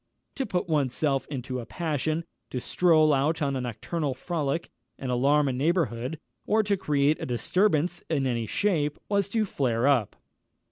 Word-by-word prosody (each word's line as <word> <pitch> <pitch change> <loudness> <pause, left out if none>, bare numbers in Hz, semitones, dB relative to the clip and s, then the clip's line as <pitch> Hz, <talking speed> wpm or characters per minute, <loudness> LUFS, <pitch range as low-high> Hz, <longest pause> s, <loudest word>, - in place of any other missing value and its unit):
To 270 - -3
put 180 -1 -1
one's 145 -6 +1
self 140 -3 0
into 130 -2 -4
a 120 - -6
passion; 160 -1 -2 0.2
to 125 - -3
stroll 155 +1 +4
out 150 +4 +1
on 140 -3 0
a 130 - -1
nocturnal 135 +4 -3
frolic, 155 +1 -2 0.3
and 130 -2 -4
alarm 140 +4 +3
a 135 - 0
neighbourhood, 145 -2 0 0.3
or 220 +1 +3
to 200 0 +1
create 150 -4 +1
a - - -2
disturbance 175 - +1
in 145 -4 +1
any 120 -3 -1
shape, 150 - 0
was 200 -2 +1
to 220 +1 +1
flare 125 - 0
up. 130 -8 +2
150 Hz, 170 wpm, -27 LUFS, 130-170 Hz, 0.3 s, stroll